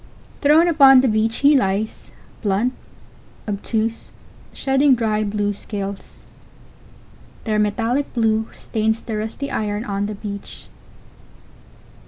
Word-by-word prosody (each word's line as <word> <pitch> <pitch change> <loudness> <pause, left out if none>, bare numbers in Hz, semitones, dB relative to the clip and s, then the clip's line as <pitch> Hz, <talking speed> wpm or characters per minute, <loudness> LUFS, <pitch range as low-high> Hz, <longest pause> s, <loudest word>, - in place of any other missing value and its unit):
Thrown 305 +4 +5
upon 275 -5 +7
the 265 - +2
beach 220 0 +1
he 290 +1 +7
lies, 200 -2 -1 0.3
blunt, 215 +4 0 0.7
obtuse, 220 +2 -2 0.4
shedding 270 0 +2
dry 215 -2 0
blue 205 0 -1
scales. 200 -1 -7 1.2
Their 215 -2 0
metallic 230 +6 0
blue 220 -1 +1
stains 220 0 -2
the 225 - -6
rusty 220 +6 -4
iron 210 +1 -2
on 200 0 -2
the 210 - -5
beach. 200 -1 -8
220 Hz, 110 wpm, -20 LUFS, 205-250 Hz, 1.2 s, upon